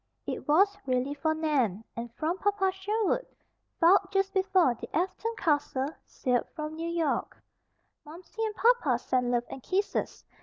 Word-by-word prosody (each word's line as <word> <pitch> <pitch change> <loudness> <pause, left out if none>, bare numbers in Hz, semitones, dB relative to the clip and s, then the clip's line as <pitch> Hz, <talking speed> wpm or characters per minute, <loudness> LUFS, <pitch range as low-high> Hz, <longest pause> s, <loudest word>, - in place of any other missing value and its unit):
It - - -5
was 390 +7 +4
really 255 +2 0
for 315 +2 0
Nan, 265 - 0
and 235 0 -5
from 335 +4 -1
Papa 400 -2 +1
Sherwood 420 +5 -1 0.5
filed 375 +3 +5
just 390 0 +1
before 375 -7 +3
the 230 - -9
Afton 380 +6 -1
Castle 290 -3 0 0.2
sailed 250 -4 0
from 305 -1 -4
New 330 +1 -3
York: 330 -4 -1 0.6
"Momsey 350 +8 -7
and 435 -1 -2
papa 450 - +3
send 250 0 0
love 240 -1 +1
and 270 - -8
kisses. 390 +9 -2
330 Hz, 150 wpm, -29 LUFS, 265-390 Hz, 0.6 s, filed